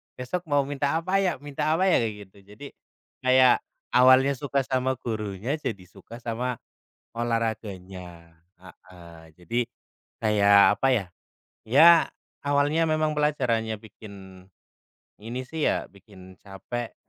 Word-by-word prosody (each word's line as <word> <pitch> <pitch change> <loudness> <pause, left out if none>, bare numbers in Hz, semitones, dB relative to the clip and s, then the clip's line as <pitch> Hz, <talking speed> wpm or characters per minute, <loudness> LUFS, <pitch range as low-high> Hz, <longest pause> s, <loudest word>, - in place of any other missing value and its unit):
besok 150 +9 -5
mau 145 -1 +3
minta 140 0 -2
apa, 185 +4 0
ya 185 -4 +1
minta 145 +2 -2
apa, 185 +4 +2
ya?" - - +4
kayak 110 -2 -2
gitu. 95 - -24 0.2
Jadi, 140 +7 -10 0.6
kayak 130 -1 +5 0.3
awalnya 130 +2 +6
suka 140 +1 -1
sama 130 0 0
gurunya, 110 +4 -3
jadi 110 -10 -5
suka 115 +6 -13
sama 120 +1 -3 0.6
olahraganya. 95 -7 -5 0.2
Heeh. 85 -2 -15 0.2
Jadi, 90 +8 -2 0.6
kayak 100 -2 +5
apa, 135 - +1
ya. 110 -7 0 0.6
Ya, 140 +9 +7 0.5
awalnya 145 +3 +1
memang 155 -1 0
pelajarannya 120 -7 0
bikin 95 -3 -13 0.8
ini 120 +4 -5
sih 155 +4 -1
ya, - - -1
bikin 95 -2 -16
capek. 110 +4 -7
120 Hz, 125 wpm, -25 LUFS, 100-140 Hz, 0.8 s, Ya